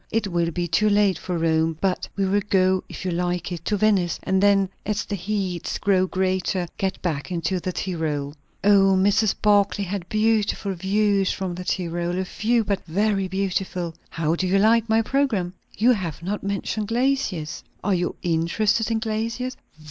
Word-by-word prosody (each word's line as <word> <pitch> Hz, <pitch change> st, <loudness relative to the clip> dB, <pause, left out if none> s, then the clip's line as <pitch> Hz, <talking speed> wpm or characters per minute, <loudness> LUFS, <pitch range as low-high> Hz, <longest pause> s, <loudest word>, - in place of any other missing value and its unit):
It 225 Hz, -1 st, 0 dB
will 170 Hz, -1 st, +1 dB
be 175 Hz, +1 st, -2 dB
too 215 Hz, +6 st, +2 dB
late 205 Hz, -4 st, +3 dB
for 180 Hz, -2 st, -3 dB
Rome; 160 Hz, -1 st, +1 dB
but 190 Hz, -2 st, 0 dB
we 195 Hz, -, +1 dB
will 200 Hz, +2 st, +2 dB
go, 185 Hz, -1 st, +3 dB
if -, -, -8 dB
you 185 Hz, -, 0 dB
like 175 Hz, 0 st, -2 dB
it, 170 Hz, -2 st, -5 dB
to 210 Hz, -, +1 dB
Venice; 195 Hz, -5 st, +2 dB
and 190 Hz, 0 st, +1 dB
then, 200 Hz, -1 st, +4 dB, 0.2 s
as 210 Hz, 0 st, -2 dB
the -, -, -5 dB
heats 190 Hz, -2 st, -2 dB
grow 190 Hz, -2 st, +2 dB
greater, 185 Hz, -1 st, 0 dB
get 190 Hz, -1 st, -1 dB
back 160 Hz, -1 st, -2 dB
into 175 Hz, +2 st, -1 dB
the 185 Hz, -, -3 dB
Tyrol." 155 Hz, -6 st, -3 dB, 0.3 s
"O, 195 Hz, -1 st, +5 dB
Mrs. 205 Hz, +2 st, +3 dB
Barclay 205 Hz, -1 st, +3 dB
had 190 Hz, -1 st, -4 dB
beautiful 215 Hz, -2 st, +1 dB
views 195 Hz, +1 st, +1 dB
from 190 Hz, -2 st, -3 dB
the 180 Hz, +1 st, -6 dB
Tyrol; 175 Hz, -1 st, -2 dB
a 190 Hz, -, -1 dB
few, 230 Hz, +5 st, +1 dB
but 200 Hz, -2 st, -2 dB
very 195 Hz, +3 st, +1 dB
beautiful." 185 Hz, -2 st, -2 dB, 0.2 s
"How 165 Hz, -1 st, -1 dB
do 185 Hz, +2 st, -1 dB
you 190 Hz, +2 st, +3 dB
like 225 Hz, +2 st, +3 dB
my 225 Hz, +1 st, +3 dB
programme?" 220 Hz, -9 st, 0 dB, 0.2 s
"You 235 Hz, +4 st, +5 dB
have 175 Hz, -8 st, -2 dB
not 205 Hz, +4 st, -2 dB
mentioned 200 Hz, +1 st, -2 dB
glaciers." 230 Hz, -, -1 dB, 0.2 s
"Are 200 Hz, -, +1 dB
you' 175 Hz, -1 st, -1 dB
interested 180 Hz, +7 st, +1 dB
in 225 Hz, -, +1 dB
glaciers?" 230 Hz, +3 st, -2 dB
190 Hz, 180 wpm, -23 LUFS, 175-210 Hz, 0.3 s, O